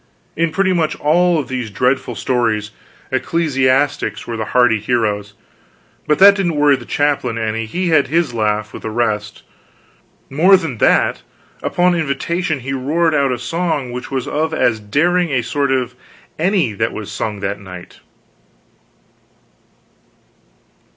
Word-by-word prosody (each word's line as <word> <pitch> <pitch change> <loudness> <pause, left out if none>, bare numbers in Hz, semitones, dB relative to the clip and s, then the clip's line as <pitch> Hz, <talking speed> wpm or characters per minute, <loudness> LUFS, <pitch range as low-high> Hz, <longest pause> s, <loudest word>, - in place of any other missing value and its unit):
In 165 0 0
pretty 185 +3 +1
much 160 -3 0
all 175 +3 +2
of 145 -5 -2
these 125 -3 -4
dreadful 125 +3 0
stories, 110 -2 -1 0.4
ecclesiastics 135 -7 0
were 115 - -5
the 110 -1 -3
hardy 120 -3 +3
heroes, 105 -2 -1 0.7
but 150 - +3
that 200 +1 +8
didn't 185 -5 -1
worry 145 -1 +4
the 125 -2 -9
chaplain 140 -5 0
any, 110 0 -2
he 180 +10 -2
had 155 -3 +3
his 160 -3 0
laugh 105 -2 -1
with - - -8
the 110 - -4
rest; 110 -2 -2 0.8
more 180 +8 +5
than 155 - -5
that, - - +2 0.4
upon 180 0 +2
invitation 160 0 -2
he 135 +2 -4
roared 155 +5 0
out 140 -3 +2
a 125 - -1
song 145 0 -2
which 125 +1 -6
was 130 -2 -3
of 160 +2 -1
as 110 -7 +1
daring 170 +12 +1
a 130 -4 0
sort 140 +2 -1
as 130 -2 0 0.5
any 175 - +1
that 110 +3 -1
was 105 -2 -7
sung 105 -2 -4
that 100 0 -3
night. 90 -2 -11
135 Hz, 145 wpm, -18 LUFS, 115-160 Hz, 0.8 s, that